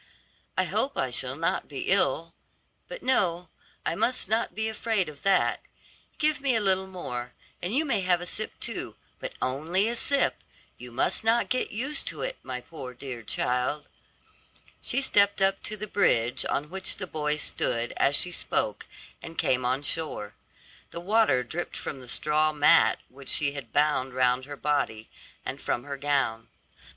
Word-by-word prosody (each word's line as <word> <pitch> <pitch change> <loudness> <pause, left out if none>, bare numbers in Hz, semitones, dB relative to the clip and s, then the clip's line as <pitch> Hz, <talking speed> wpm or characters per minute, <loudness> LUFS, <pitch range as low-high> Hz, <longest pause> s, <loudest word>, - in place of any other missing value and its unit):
I - - +4
hope - - 0
I - - 0
shall - - -1
not - - -1
be - - -6
ill. - - +2 0.5
But - - -8
no, 180 -9 +1 0.4
I - - +1
must 250 +8 0
not 220 +3 0
be 220 0 0
afraid 220 -3 0
of 150 -2 -10
that. 195 0 +3 0.6
Give 305 -2 +2
me 270 -3 +2
a - - +3
little 190 -2 +3
more, 125 -10 -6 0.3
and 175 - -2
you 310 +3 +3
may 235 -9 +1
have 180 -1 +3
a 175 - -6
sip - - -5
too, - - -2 0.2
but - - -5
only 160 +10 +1
a 235 - -1
sip; 280 +3 +3 0.4
you 125 0 -9
must 170 - +1
not 230 +2 +3
get 255 - +1
used 265 +8 -2
to - - -3
it, - - -4
my 125 -1 -5
poor, 130 -4 -9
dear 125 -2 -7
child." 125 +6 -1 0.9
She 275 - +1
stepped 200 -6 +4
up 195 0 +2
to 215 - -4
the 210 - -4
bridge 120 - +2
on 150 +3 -1
which 190 0 -1
the 185 - -4
boy 150 -3 -1
stood 120 -5 -1
as 140 - +3
she 180 - +4
spoke, - - -1 0.3
and 165 - -9
came 130 0 +2
on 130 +3 0
shore. 145 -10 -2 0.6
The 170 - -6
water 190 - +3
dripped 165 +8 -5
from 140 - -5
the 125 - -12
straw 155 +4 +2
mat 150 +2 +5
which 135 +1 -11
she 145 -2 +3
had 140 -6 -8
bound 145 -3 +1
round 130 0 +2
her 145 0 -8
body, 140 -7 -1 0.4
and - - -4
from 120 - -1
her 140 -1 -5
gown. 135 -5 0
155 Hz, 175 wpm, -27 LUFS, 130-200 Hz, 0.9 s, mat